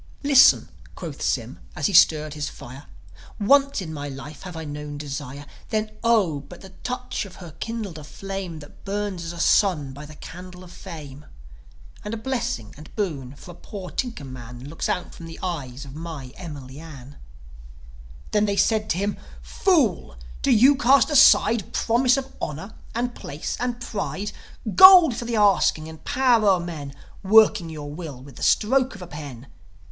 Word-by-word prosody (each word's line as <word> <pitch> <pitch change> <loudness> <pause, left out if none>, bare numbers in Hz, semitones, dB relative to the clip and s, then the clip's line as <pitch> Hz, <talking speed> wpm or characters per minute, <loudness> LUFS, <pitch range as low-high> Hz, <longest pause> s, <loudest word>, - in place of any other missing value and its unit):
"Listen," 280 -2 +6 0.3
quoth - - -7
Sym, - - -2 0.2
as - - -2
he 205 - +1
stirred 155 -4 +5
his 150 -1 -4
fire. 130 +4 -11 0.5
"Once 275 +1 +3
in 160 -2 -7
my 145 -1 -5
life 140 +2 -9
have 180 -3 -8
I 160 - -5
known 145 0 -6
desire. 145 -1 -6 0.2
Then, 215 0 -1
Oh, 210 -11 +3
but 170 +5 -13
the 190 - -12
touch 250 0 -3
of 195 -3 -11
her 175 -3 -10
kindled 215 -8 -5
a - - -10
flame 190 0 -6
That 145 - -15
burns 200 -3 -3
as 165 - -5
a 170 - -9
sun 165 -8 +2
by 145 +2 -10
the 155 - -12
candle 180 +3 -10
of 180 - -13
fame. 150 -4 -10 0.8
And 210 +1 -4
a - - -5
blessing 220 - -3
and 150 0 -12
boon 145 - -3
for 175 - -12
a - - -11
poor 185 +1 -9
tinker 240 - -3
man 125 -1 -9
Looks 150 +4 -4
out 180 - -2
from 165 - -10
the 165 - -10
eyes 145 -7 -4
of 135 - -11
my 155 -5 -7
Emily 145 -6 -9
Ann." 145 -4 -11 1.1
Then 210 0 +3
they 200 -1 -1
said 215 +2 +2
to 165 - +1
him, 200 +2 -1 0.3
"Fool! 255 - +1 0.3
Do - - 0
you 265 +5 +6
cast 275 +2 +4
aside 235 -6 +5
Promise 245 +3 +3
of 270 0 -5
honour, 160 +9 -5 0.2
and 240 +1 -1
place, 145 -7 -5
and 245 0 -2
pride, 205 -3 -4 0.4
Gold 370 -8 +9
for 235 - -5
the 235 0 -2
asking, 195 -6 +3
and 160 0 -11
power 250 -6 +3
o'er 190 -2 +4
men 155 -5 -6 0.3
Working 210 -3 +5
your 145 -2 -7
will 150 -6 -8
with 135 -3 -14
the - - -10
stroke 260 +3 +2
of 190 - -9
a - - -9
pen? 145 -6 -9
180 Hz, 180 wpm, -24 LUFS, 145-220 Hz, 1.1 s, Gold